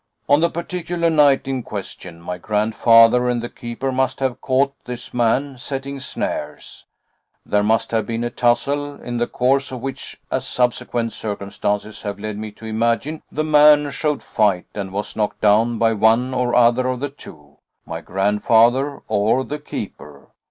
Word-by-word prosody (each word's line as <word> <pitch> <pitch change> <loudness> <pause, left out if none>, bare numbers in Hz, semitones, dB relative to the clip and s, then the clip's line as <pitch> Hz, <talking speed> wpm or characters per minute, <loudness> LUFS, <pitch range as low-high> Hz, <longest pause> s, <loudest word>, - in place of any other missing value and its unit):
On 145 +1 +5
the 170 +1 +3
particular 170 0 -2
night 145 -4 +4
in 135 -1 -2
question, 95 -5 -7
my 90 +1 -6
grandfather 115 +4 +4
and 120 -1 0
the 120 +1 -5
keeper 120 +3 -5
must 130 0 0
have 130 -2 -2
caught 135 +1 +1
this 125 -1 -7
man 125 +3 0
setting 135 +1 -5
snares; - - -5 0.6
there 105 - +1
must 110 +2 +1
have 110 -2 0
been 115 0 -2
a 120 - -2
tussle, 140 +4 0
in 120 0 -5
the 120 0 0
course 135 +3 +1
of 130 -2 -6
which 135 0 -6
as - - -1
subsequent 120 -2 -1
circumstances 105 0 -3
have 100 -1 -4
led 105 0 -5
me 110 0 -5
to 105 +2 -13
imagine, 115 +7 -1
the 155 - -1
man 150 -1 +5
showed 150 +1 -1
fight 100 -4 +1
and 100 -2 -5
was 105 +2 -4
knocked 105 -1 -1
down 110 +3 +3
by 115 0 +2
one 115 +4 +3
or 125 -1 0
other 125 +1 +4
of 130 -1 -2
the 145 +2 -3
two 75 - -14 0.3
my - - -6
grandfather 115 +8 +2
or 110 +4 +2
the 150 +1 -5
keeper. 75 - -8
120 Hz, 165 wpm, -20 LUFS, 110-135 Hz, 0.6 s, On